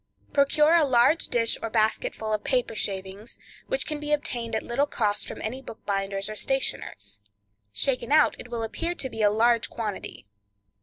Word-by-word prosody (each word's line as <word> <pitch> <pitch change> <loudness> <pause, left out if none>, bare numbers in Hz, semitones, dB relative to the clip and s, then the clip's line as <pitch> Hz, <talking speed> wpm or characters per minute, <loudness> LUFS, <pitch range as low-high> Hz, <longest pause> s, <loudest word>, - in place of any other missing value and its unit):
Procure 300 +2 +4
a 340 -2 +6
large 260 +3 +4
dish 230 -2 +1
or 225 - -3
basketful 220 0 0
of 210 - -1
paper 250 -4 0
shavings, 195 +2 -4 0.3
which - - -1
can 300 -1 -3
be 295 0 -4
obtained 240 -6 -1
at 220 - -1
little 275 +5 0
cost 210 -6 0
from - - -6
any 250 +5 -3
bookbinder's 195 -4 -3
or 215 - -5
stationer's. 100 - -2 0.5
Shaken 250 - 0
out 305 0 +5
it 245 - -9
will 235 -1 -3
appear 335 +10 -2
to 265 - -2
be 225 - -4
a 205 - +6
large 230 +2 +3
quantity. 210 - -5
230 Hz, 170 wpm, -26 LUFS, 215-275 Hz, 0.5 s, a